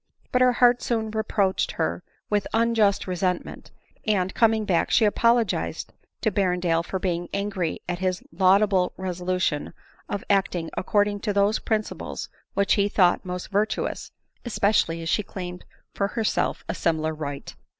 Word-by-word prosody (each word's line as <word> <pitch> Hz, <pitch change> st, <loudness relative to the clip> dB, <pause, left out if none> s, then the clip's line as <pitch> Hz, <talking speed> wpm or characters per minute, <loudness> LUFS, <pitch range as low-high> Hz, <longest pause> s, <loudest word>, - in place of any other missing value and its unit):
But 250 Hz, -, +2 dB
her 250 Hz, 0 st, +5 dB
heart 245 Hz, 0 st, +4 dB
soon 220 Hz, -2 st, -1 dB
reproached 210 Hz, -3 st, 0 dB
her 85 Hz, +2 st, -1 dB, 0.3 s
with 205 Hz, -1 st, 0 dB
unjust 225 Hz, -3 st, +2 dB
resent 180 Hz, -1 st, -1 dB
ment; -, -, -10 dB, 0.4 s
and, 190 Hz, -3 st, +1 dB
coming 225 Hz, -2 st, +3 dB
back, 175 Hz, -4 st, +1 dB
she 225 Hz, -, +4 dB
apologized 230 Hz, +1 st, +1 dB, 0.3 s
to 220 Hz, -, +1 dB
Berrendale 180 Hz, -4 st, +1 dB
for 190 Hz, -, -3 dB
being 175 Hz, -2 st, -2 dB
angry 195 Hz, -5 st, -2 dB
at 175 Hz, 0 st, -3 dB
his 185 Hz, -1 st, -1 dB
laudable 190 Hz, +1 st, +3 dB
resolution 180 Hz, -4 st, -2 dB, 0.3 s
of 205 Hz, -, -3 dB
acting 185 Hz, -4 st, 0 dB
accord 205 Hz, +2 st, +2 dB
ing 205 Hz, 0 st, -4 dB
to 205 Hz, 0 st, -2 dB
those 200 Hz, +2 st, +2 dB
principles 215 Hz, -1 st, -3 dB, 0.3 s
which 200 Hz, 0 st, +3 dB
he 200 Hz, 0 st, +2 dB
thought 180 Hz, -3 st, +3 dB
most 180 Hz, +2 st, -6 dB
virtuous, 210 Hz, +2 st, -1 dB, 0.3 s
especially 200 Hz, -7 st, +1 dB
as 165 Hz, -, -3 dB
she 210 Hz, -, +2 dB
claimed 180 Hz, -3 st, -7 dB, 0.3 s
for 200 Hz, -, 0 dB
herself 220 Hz, 0 st, -1 dB
a -, -, -2 dB
similar 160 Hz, -1 st, 0 dB
right. 145 Hz, -2 st, -6 dB
195 Hz, 150 wpm, -25 LUFS, 180-215 Hz, 0.4 s, her